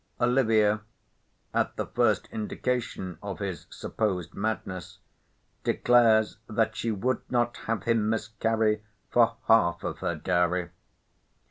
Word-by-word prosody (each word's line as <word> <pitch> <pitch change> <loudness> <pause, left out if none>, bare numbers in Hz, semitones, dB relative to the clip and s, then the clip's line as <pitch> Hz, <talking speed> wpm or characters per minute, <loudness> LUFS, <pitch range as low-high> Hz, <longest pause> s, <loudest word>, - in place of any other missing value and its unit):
Olivia, 110 -4 +3 0.7
at - - 0
the - - -2
first 115 -4 +1
indication 110 -5 -3
of 100 -2 -5
his 95 -4 -5
supposed 90 -6 -2
madness, 95 -4 -4 0.7
declares 110 -4 +4
that 110 0 +1
she 115 - -2
"would 115 +5 0
not 120 -1 +1
have 110 -4 -1
him 115 -2 +2
miscarry 110 -1 0 0.3
for 115 -1 +4
half 85 -6 +4
of - - -4
her - - -1
dowry." 90 0 0
110 Hz, 115 wpm, -27 LUFS, 100-115 Hz, 0.7 s, declares